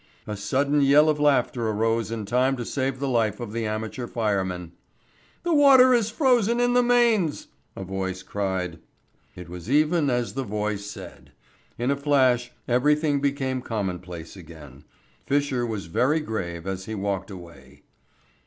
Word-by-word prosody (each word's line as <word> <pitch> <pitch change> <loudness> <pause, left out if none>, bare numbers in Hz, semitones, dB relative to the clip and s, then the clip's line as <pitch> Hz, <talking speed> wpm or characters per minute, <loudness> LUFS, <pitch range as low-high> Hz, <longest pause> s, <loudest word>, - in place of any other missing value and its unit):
A 105 - -5
sudden 140 +8 +1
yell 145 +3 +5
of 150 -1 0
laughter 130 -5 +2
arose 115 +1 0
in 115 -2 -4
time 130 +5 +1
to 120 - -4
save 130 0 -2
the 140 - -2
life 115 -5 0
of 115 -3 -6
the 115 -1 -2
amateur 110 +3 -4
fireman. 95 -7 -2 0.7
"The 345 -1 0
water 270 -3 +7
is 230 -3 +2
frozen 240 -2 +2
in 245 0 +2
the 245 - +5
mains," 235 -9 +2 0.3
a - - -6
voice 95 0 -4
cried. 95 -4 -3 0.6
It 90 -2 -9
was 90 +4 -9
even 150 +1 +2
as 120 -2 -1
the 135 - -3
voice 105 -3 -3
said. - - -11 0.4
In 120 +3 0
a - - +2
flash 130 -4 +2 0.2
everything 145 +3 +2
became 135 -2 -1
commonplace 90 -7 -5
again. 75 -6 -13 0.4
Fisher 140 -4 0
was 110 -5 -4
very 130 - +1
grave 85 - -5
as 95 -1 -4
he 110 - -5
walked 95 -1 -3
away. 90 -4 -13
120 Hz, 155 wpm, -25 LUFS, 95-145 Hz, 0.7 s, water